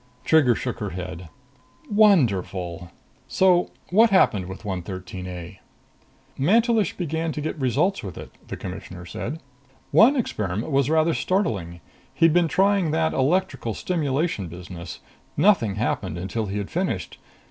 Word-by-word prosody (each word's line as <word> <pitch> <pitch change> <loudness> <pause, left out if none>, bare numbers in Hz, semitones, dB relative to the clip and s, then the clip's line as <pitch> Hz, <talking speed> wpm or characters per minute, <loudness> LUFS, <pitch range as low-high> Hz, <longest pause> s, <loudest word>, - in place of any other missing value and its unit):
Trigger 145 -7 +4
shook 125 -2 -4
her 105 -3 -3
head. 90 -2 -7 0.6
"Wonderful! 100 - +2 0.4
So 180 -2 +3 0.2
what 225 +5 +6
happened 105 - +3
with 95 +4 -9
113 95 -1 -5
A?" 90 +1 -8 0.8
"Mantelish 220 - +2
began 165 -1 -2
to - - -4
get 155 +1 -3
results 140 - +1
with 95 -7 -8
it," - - -9 0.2
the - - -6
Commissioner 90 -1 -8
said. 140 - -5 0.5
"One 255 +6 +6
experiment 110 - -2
was 135 0 +2
rather 160 +1 +3
startling. 100 - -1 0.3
He'd 165 -1 +4
been 175 -1 +4
trying 190 +2 +2
that 160 +1 +1
electrical 150 - 0
stimulation 150 - -1
business. 85 +1 -9 0.4
Nothing 160 - +3
happened 95 -5 -2
until 100 +5 -3
he 100 +2 -3
had 100 -1 -4
finished. 175 - -3
130 Hz, 135 wpm, -24 LUFS, -, 0.8 s, what